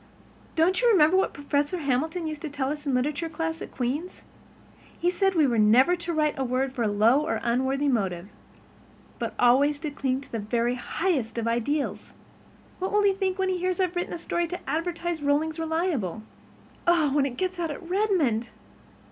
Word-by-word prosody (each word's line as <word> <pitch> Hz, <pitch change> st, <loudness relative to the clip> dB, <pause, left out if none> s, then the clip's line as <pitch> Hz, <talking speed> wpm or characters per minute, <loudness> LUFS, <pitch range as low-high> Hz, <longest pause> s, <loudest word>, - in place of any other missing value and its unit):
Don't 360 Hz, +5 st, +3 dB
you 485 Hz, -, +4 dB
remember 350 Hz, -5 st, +5 dB
what 380 Hz, -, +2 dB
Professor 285 Hz, +4 st, -1 dB
Hamilton 315 Hz, +4 st, -1 dB
used 310 Hz, -2 st, -5 dB
to 310 Hz, -, -4 dB
tell 275 Hz, -1 st, -2 dB
us 295 Hz, -1 st, -6 dB
in -, -, +1 dB
the -, -, +3 dB
literature 300 Hz, +6 st, -1 dB
class 325 Hz, +1 st, -3 dB
at -, -, -6 dB
Queen's? 280 Hz, +9 st, -3 dB, 0.7 s
He 350 Hz, -, +1 dB
said 385 Hz, +1 st, +1 dB
we 315 Hz, -3 st, +4 dB
were 240 Hz, -4 st, +1 dB
never 245 Hz, +11 st, +5 dB
to 345 Hz, -1 st, -5 dB
write 305 Hz, -2 st, 0 dB
a -, -, +1 dB
word 260 Hz, +1 st, -1 dB
for 255 Hz, -, -4 dB
a 225 Hz, -, +2 dB
low 220 Hz, +7 st, +4 dB
or 310 Hz, -, -1 dB
unworthy 265 Hz, +4 st, +1 dB
motive, 195 Hz, -8 st, -1 dB, 0.9 s
but -, -, -3 dB
always 275 Hz, +4 st, +4 dB
to 305 Hz, -3 st, -3 dB
cling 265 Hz, -2 st, -1 dB
to 275 Hz, -, -15 dB
the 230 Hz, -, -2 dB
very 235 Hz, +3 st, 0 dB
highest 255 Hz, -2 st, -2 dB
ideals. 235 Hz, +6 st, -1 dB, 0.7 s
What 375 Hz, +1 st, -2 dB
will 415 Hz, 0 st, +3 dB
he 400 Hz, -1 st, +4 dB
think 380 Hz, -1 st, -1 dB
when 380 Hz, -1 st, 0 dB
he 370 Hz, -1 st, -1 dB
hears 365 Hz, +1 st, -1 dB
I've 365 Hz, -1 st, 0 dB
written 350 Hz, -, -2 dB
a -, -, -3 dB
story 345 Hz, +1 st, -1 dB
to 360 Hz, +2 st, -7 dB
advertise 335 Hz, +2 st, -2 dB
Rollings 305 Hz, +3 st, 0 dB
Reliable? 320 Hz, -, -1 dB
And, 215 Hz, -, -10 dB, 0.6 s
oh, 325 Hz, -5 st, +3 dB
when 280 Hz, -2 st, +3 dB
it 245 Hz, -2 st, -7 dB
gets 370 Hz, -1 st, -2 dB
out 335 Hz, -2 st, -1 dB
at 320 Hz, +3 st, -7 dB
Redmond! 350 Hz, -, +1 dB
300 Hz, 200 wpm, -26 LUFS, 255-345 Hz, 0.9 s, remember